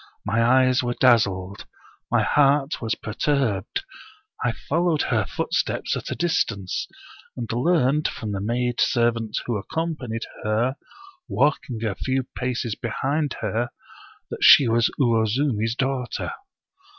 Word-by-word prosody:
My 110 +2 +1
eyes 130 +2 +4
were 120 -1 -2
dazzled, 100 -7 +2 0.4
my - - +2
heart 140 0 +2
was 115 -1 -1
perturbed. 115 - -1 0.6
I 120 - +2
followed 160 +6 0
her - - +1
footsteps - - -1
at - - -5
a - - -3
distance, 105 - -1 0.5
and 120 -2 -4
learned 150 +2 +2
from 110 -2 -5
the 100 -1 -3
maid 120 +3 -1
servant 115 -2 +1
who 120 -3 -1
accompanied 130 -1 -4 0.2
her, 115 +5 0 0.5
walking 130 -5 0
a 105 - 0
few 130 +7 -1
paces 125 -2 -2
behind 140 +6 -2
her, 115 +3 -1 0.6
that - - -4
she 135 - +8
was 115 +1 +3
Uwozumi's 115 -1 +1
daughter. 130 -1 -2
120 Hz, 125 wpm, -24 LUFS, 110-135 Hz, 0.6 s, she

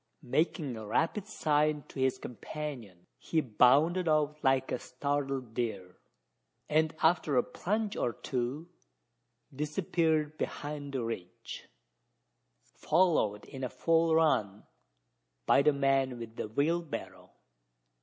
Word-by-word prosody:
Making 145 0 0
a 110 -1 -7
rapid 165 - 0
sign 150 -6 +1
to - - -8
his 130 -1 +2
companion, 120 - -7
he 165 - 0
bounded 145 - +4
off 150 -1 +1
like 135 -1 +2
a - - -1
startled 135 -2 -3
deer; 100 -7 -4 0.7
and, 155 +1 +2
after 160 -4 +3
a 125 - +5
plunge 210 +2 -2
or 120 - 0
two, 130 +7 -3 0.9
disappeared 155 0 0
behind 145 -1 -4
the 130 -3 -1
ridge 95 -6 -7 0.9
followed 155 - +1
in 130 -2 -5
full 165 +2 +2
run 105 -11 +2 0.8
by - - +5
the 150 - +5
man 135 -2 +1
with 115 -1 -8
the - - -4
wheelbarrow! 155 +8 -2
145 Hz, 115 wpm, -31 LUFS, 125-160 Hz, 0.9 s, a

